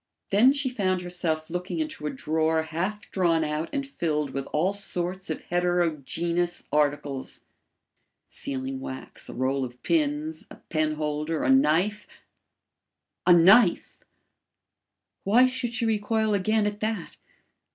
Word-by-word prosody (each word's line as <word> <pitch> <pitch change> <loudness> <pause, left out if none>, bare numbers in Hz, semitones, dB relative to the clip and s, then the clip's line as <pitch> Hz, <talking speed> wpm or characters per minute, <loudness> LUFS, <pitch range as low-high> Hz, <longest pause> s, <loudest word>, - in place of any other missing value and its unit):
Then 220 +7 +6
she 285 -1 0
found 190 -7 0
herself 170 -3 -2
looking 180 - -3
into 310 - -3
a - - 0
drawer 160 +3 0
half 185 +7 -4
drawn 170 -4 +2
out 155 +1 -2
and 280 -1 -2
filled 150 - -2
with 135 0 -4
all 175 +6 +1
sorts 185 -2 -3
of - - -4
heterogeneous 175 0 0
articles: 145 -2 -1 0.9
sealing 135 0 -4
wax, 130 0 -8
a - - -7
roll 130 +2 0
of 125 -1 -8
pins, 155 0 -1
a - - -11
pen 155 -1 -2
holder, 150 +1 -2
a - - +3
knife 210 - +2 1.2
A 180 - +8
KNIFE! 185 +4 +5 1.2
Why 230 +6 +5
should 255 -2 -2
she 235 - 0
recoil 220 0 +1
again 210 +2 +2
at 205 0 -2
that? 215 -5 -3
175 Hz, 130 wpm, -26 LUFS, 150-210 Hz, 1.2 s, A